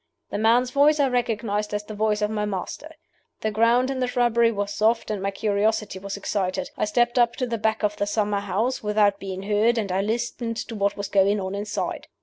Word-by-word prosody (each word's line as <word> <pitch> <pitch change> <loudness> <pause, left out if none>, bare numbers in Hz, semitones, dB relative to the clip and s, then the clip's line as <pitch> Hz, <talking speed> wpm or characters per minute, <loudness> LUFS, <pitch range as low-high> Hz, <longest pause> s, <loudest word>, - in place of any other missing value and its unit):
The - - -2
man's 240 +3 +3
voice 295 +3 +4
I 280 - +4
recognized 215 -4 -1
as 205 - -2
the 215 - -8
voice 210 0 0
of 210 - 0
my 210 -1 -1
master. 210 - -5 0.5
The 215 - -1
ground 235 +4 +3
in 265 - -3
the 250 - +1
shrubbery 235 -2 +3
was 205 -1 -3
soft, 225 +1 +1
and 205 -2 -3
my 195 - 0
curiosity 205 0 0
was 200 +1 -5
excited. 190 -2 -2
I - - 0
stepped 240 +3 +1
up 235 -1 +3
to 255 - -1
the 235 -2 -3
back 220 0 0
of 210 0 0
the 205 - -1
summer 205 -1 0
house 205 +6 -1
without 210 -1 +2
being 190 -1 -6
heard, 215 +4 +2
and 205 -4 -1
I 190 +1 +1
listened 230 +2 -2
to 230 - -5
what 200 -1 0
was 200 -1 -3
going 200 +1 +3
on 190 0 -4
inside. 205 -2 -3
210 Hz, 220 wpm, -24 LUFS, 205-235 Hz, 0.5 s, voice